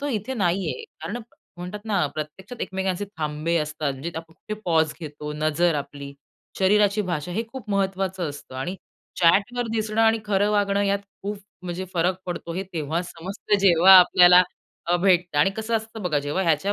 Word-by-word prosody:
तो 285 - -3
इथे 250 0 -2
नाहीये. 195 - -1 0.2
कारण - - -4 0.4
म्हणतात 180 +4 -6
ना, 205 -8 +1
प्रत्यक्षात 180 +10 -7
एकमेकांचे 190 0 -2
थांबे 155 +2 -1
असतात. 150 -1 -2
म्हणजे 135 +6 -6
आपण 165 0 -7
कुठे 215 - -7
पॉज 160 -3 +2
घेतो, 150 -1 -6
नजर 155 +3 +1
आपली, 140 -1 -6 0.5
शरीराची 205 +2 +3
भाषा 170 +1 -3
हे 220 +5 -1
खूप 255 -5 -8
महत्त्वाचं 190 -3 -1
असतं 145 -2 -11
आणि 175 +9 -4 0.4
चॅट 195 +7 +4
वर 245 - -1
दिसणं 220 0 -1
आणि 225 0 +4
खरं 205 0 +1
वागणं 200 -1 +2
यात 200 0 +1 0.2
खूप 205 +1 -3 0.3
म्हणजे 180 +1 -4
फरक 175 +2 +2
पडतो. 175 -1 -5
हे 185 - -2
तेव्हा 160 +1 -2
समजतं, 185 +4 -2
जेव्हा 190 -1 +7
आपल्याला 180 0 +7 0.4
अ, 175 +1 +3
भेटतं 175 -3 +2
आणि 150 +6 +4
कसं 220 +1 -2
असतं 220 0 -7
बघा, 165 -5 +1
जेव्हा 145 +6 -2
ह्याच्या 170 +3 +1
180 Hz, 170 wpm, -24 LUFS, 160-200 Hz, 0.5 s, जेव्हा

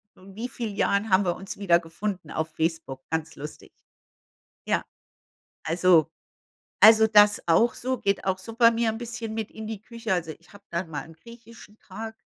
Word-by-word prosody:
wie 195 +5 -8
viel 235 -4 -5
Jahren 200 +2 +1
haben 190 +1 +4
wir 175 -1 0
uns 195 +1 -8
wieder 175 -4 +3
gefunden 175 0 -5
auf 160 0 -3
Facebook. 160 -5 -3
Ganz 160 0 -3
lustig. 150 +2 -10 0.9
Ja, - - 0 0.8
also 165 -1 +3 0.7
also, 220 0 +8
das 210 -1 +5
auch 225 +9 +4
so. 260 +1 -2
Geht 200 -3 -1
auch 190 -1 0
super 230 +4 +3
mir 230 0 0
'n 225 - -6
bisschen 230 -1 -6
mit 220 -1 -4
in 220 0 -8
die 215 -2 -6
Küche. 230 -3 -4
Also, 165 -3 -2
ich 170 - -24
habe 205 0 -16
dann 170 0 -3
mal 145 -3 -4
'n 165 - -14
griechischen 230 +2 -15
Tag, 220 +3 -8
200 Hz, 175 wpm, -25 LUFS, 170-225 Hz, 0.9 s, also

